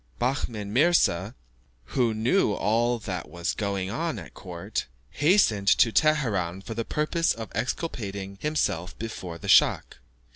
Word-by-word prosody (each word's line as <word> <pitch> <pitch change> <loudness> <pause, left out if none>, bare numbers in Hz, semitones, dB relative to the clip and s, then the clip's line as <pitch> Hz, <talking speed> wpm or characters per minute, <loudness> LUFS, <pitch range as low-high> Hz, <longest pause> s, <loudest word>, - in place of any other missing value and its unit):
Behmen 115 -5 -2
Mirza, 125 - +3 0.6
who 120 -3 +2
knew 110 - +2
all 120 +4 +1
that 95 -5 -5
was 85 -1 -2
going 100 -2 -2
on 165 +7 -2
at - - -10
court, 85 -8 -5 0.2
hastened 145 - +3
to 115 - +5
Teheran 110 - +1
for 115 - -6
the 115 +1 -2
purpose 155 +6 0
of 115 -2 -8
exculpating 100 - -4
himself 90 - -1
before 95 -7 -6
the - - -9
schach. - - +4
110 Hz, 135 wpm, -26 LUFS, 95-135 Hz, 0.6 s, to